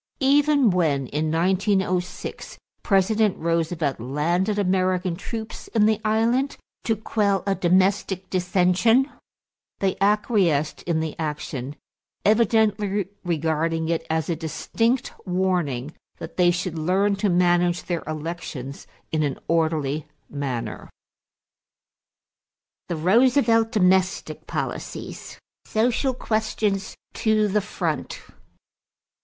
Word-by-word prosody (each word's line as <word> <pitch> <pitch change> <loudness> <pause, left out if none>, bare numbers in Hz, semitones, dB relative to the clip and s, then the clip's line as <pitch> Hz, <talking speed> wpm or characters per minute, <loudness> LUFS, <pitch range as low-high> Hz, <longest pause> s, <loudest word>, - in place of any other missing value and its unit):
Even 285 -3 +4
when 155 -7 +1
in 155 +4 -2
1906 185 +1 -1 0.2
President 210 +1 +2
Roosevelt 165 -4 -1
landed 170 - 0
American 185 -2 +1
troops 220 +4 -7
in 215 -2 +5
the 215 0 +2
island 230 +6 +1 0.3
to 225 - +2
quell 205 -2 0
a 195 - +2
domestic 190 +1 +1
dissension, 185 +8 +3 0.7
they 195 -1 0
acquiesced 195 - +2
in 165 -2 +1
the 160 -1 -4
action, 150 -3 -4 0.5
evidently 210 -3 +2
regarding 165 -1 0
it 165 -1 0
as 160 -1 0
a 170 - 0
distinct 225 - -1
warning 175 -7 -1 0.2
that - - -8
they 180 -1 +4
should 175 -1 -2
learn 195 +5 +2
to 200 +1 +1
manage 175 0 +2
their 175 -2 -2
elections 155 -4 -6 0.2
in 155 - +1
an 145 -3 -1
orderly 155 -3 0 0.2
manner. 135 -5 -4 2.0
THE 170 - -2
ROOSEVELT 225 - +3
DOMESTIC 190 -3 +1
POLICIES - - -5 0.3
=Social 245 +4 +1
Questions 215 -4 -1 0.2
to 215 -1 +2
the 210 +1 +1
Front. - - -3
185 Hz, 105 wpm, -24 LUFS, 160-215 Hz, 2.0 s, in